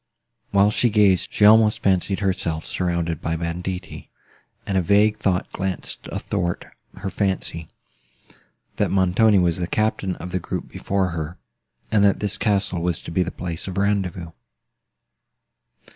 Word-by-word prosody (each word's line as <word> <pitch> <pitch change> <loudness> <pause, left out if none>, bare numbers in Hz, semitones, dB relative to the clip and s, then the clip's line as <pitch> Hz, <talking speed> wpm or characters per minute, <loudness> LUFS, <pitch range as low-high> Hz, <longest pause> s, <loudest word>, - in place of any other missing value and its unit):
While 100 +1 +4
she 120 +2 +2
gazed, 100 -4 +3
she 105 - +3
almost 110 0 +6
fancied 95 +1 +1
herself 90 -5 -1
surrounded 85 -3 -2
by 80 - -1
banditti; 90 +3 -5 0.6
and 100 - -2
a 95 - +3
vague 105 +4 +3
thought 95 -4 0
glanced 95 -1 -4
athwart 85 0 -2 0.3
her 95 0 -5
fancy—that 95 -4 -2 1.2
Montoni 95 +3 +4
was 85 -3 +2
the 90 -1 -2
captain 105 -2 0
of 90 - -8
the 95 - -1
group - - -5
before 95 -1 -1
her, 85 +1 -5 0.5
and 105 -2 +4
that 100 -1 +4
this 105 -1 -2
castle 100 -5 0
was 85 -2 -1
to - - -7
be 90 - +1
the 90 - 0
place 85 -2 -6
of 95 -1 -5
rendezvous. 95 -4 -1
95 Hz, 145 wpm, -22 LUFS, 85-100 Hz, 1.2 s, almost